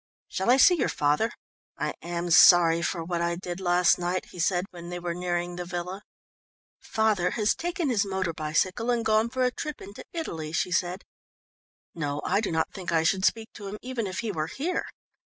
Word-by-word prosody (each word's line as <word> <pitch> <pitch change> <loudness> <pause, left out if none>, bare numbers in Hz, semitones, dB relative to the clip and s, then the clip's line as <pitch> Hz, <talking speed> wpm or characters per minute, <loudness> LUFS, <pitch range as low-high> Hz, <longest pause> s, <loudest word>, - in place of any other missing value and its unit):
"Shall 190 +5 -1
I 250 - +6
see 315 +7 +7
your 255 - +1
father? 150 +11 +1 0.5
I - - -2
am 175 0 -3
sorry 170 0 +7
for 170 -1 -2
what 170 0 -2
I 170 0 0
did 175 0 -6
last 180 -1 +3
night," 180 +1 -1
he 180 - -11
said 175 +2 +1
when 175 -1 -9
they 175 - -4
were 175 -1 -3
nearing 175 0 -2
the 180 - -3
villa. 180 +2 -5 0.8
"Father 215 -5 +1
has 215 -2 +1
taken 345 -2 -2
his 220 -4 +2
motor 190 -3 -2
bicycle 170 +9 -1
and 235 -2 +1
gone 220 +1 +3
for 255 +1 -1
a 250 - +2
trip 300 +3 -5
into 200 +2 -10
Italy," 160 - -5
she 180 - 0
said. 180 +2 -1 0.9
"No, 145 -3 -3
I 200 +3 +2
do 215 - -2
not 160 0 0
think 185 -3 -5
I 165 -1 +3
should 190 +3 +1
speak 225 -1 0
to 205 - -8
him, 205 +2 -6
even 245 -4 -3
if 185 - -3
he 225 -2 -2
were 155 -4 -2
here. 325 - -2
180 Hz, 205 wpm, -27 LUFS, 170-220 Hz, 0.9 s, see